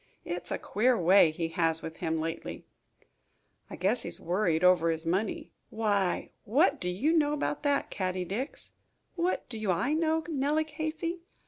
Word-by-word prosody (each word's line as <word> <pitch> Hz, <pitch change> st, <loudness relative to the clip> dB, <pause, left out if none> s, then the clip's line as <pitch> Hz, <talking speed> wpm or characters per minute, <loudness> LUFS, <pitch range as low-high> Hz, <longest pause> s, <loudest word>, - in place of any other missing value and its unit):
It 175 Hz, +1 st, -3 dB
is -, -, -9 dB
a -, -, 0 dB
queer 240 Hz, +4 st, +1 dB
way 180 Hz, -1 st, +6 dB
he 165 Hz, +1 st, -3 dB
has 165 Hz, -1 st, +1 dB
with 160 Hz, 0 st, -7 dB
him 160 Hz, 0 st, -1 dB
lately." 165 Hz, +1 st, -5 dB, 1.0 s
"I -, -, -7 dB
guess 195 Hz, +7 st, +1 dB
he -, -, -6 dB
is -, -, -1 dB
worried 175 Hz, -2 st, 0 dB
over 180 Hz, -2 st, +5 dB
his 160 Hz, 0 st, -2 dB
money." 190 Hz, +6 st, -1 dB, 0.2 s
"Why, 205 Hz, -4 st, 0 dB
what 280 Hz, -, +2 dB
do 180 Hz, -, -1 dB
you 255 Hz, -, +1 dB
know 295 Hz, -2 st, +3 dB
about 295 Hz, 0 st, -2 dB
that, 285 Hz, -1 st, 0 dB
Caddie 185 Hz, -2 st, -2 dB
Dix?" 235 Hz, -, -5 dB, 0.4 s
"What 350 Hz, +1 st, -1 dB
do 220 Hz, -4 st, -4 dB
I 185 Hz, -, +1 dB
know, 320 Hz, 0 st, +1 dB
Nellie 300 Hz, 0 st, +1 dB
Casey? 315 Hz, +3 st, -4 dB
205 Hz, 175 wpm, -29 LUFS, -, 1.0 s, way